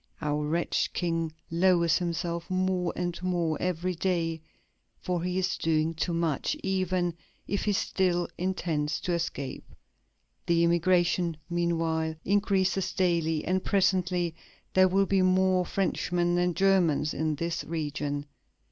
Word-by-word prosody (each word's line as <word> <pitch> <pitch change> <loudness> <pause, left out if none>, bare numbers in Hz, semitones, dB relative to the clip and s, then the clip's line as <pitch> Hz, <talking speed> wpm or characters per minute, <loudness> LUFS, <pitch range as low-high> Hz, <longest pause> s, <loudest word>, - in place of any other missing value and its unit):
"Our 150 0 -1
wretched 170 +3 0
King 165 -2 -1 0.2
lowers 170 -1 +3
himself 170 0 -3
more 185 -1 0
and 175 -1 -3
more 175 -3 0
every 180 0 -1
day; 165 -2 -1 0.6
for 180 -2 -2
he 180 +1 -2
is 190 0 0
doing 160 0 +1
too 165 +2 -2
much, 165 - 0
even 185 -2 0 0.3
if 200 - -1
he 205 - +2
still 180 -2 +1
intends 165 -5 -1
to 180 -3 -1
escape.... 165 -5 -4 0.7
The 170 0 +3
emigration, 175 -1 +2
meanwhile, 165 -2 0
increases 195 -2 +1
daily, 165 -4 +1
and 185 +1 0
presently 180 -3 +1 0.4
there 185 0 +6
will 195 +2 +2
be 195 0 +2
more 185 0 +3
Frenchmen 175 -2 0
than 175 -1 +1
Germans 180 -6 +3
in 155 -1 -1
this 165 +1 -2
region." 145 -2 -3
175 Hz, 130 wpm, -28 LUFS, 165-185 Hz, 0.7 s, there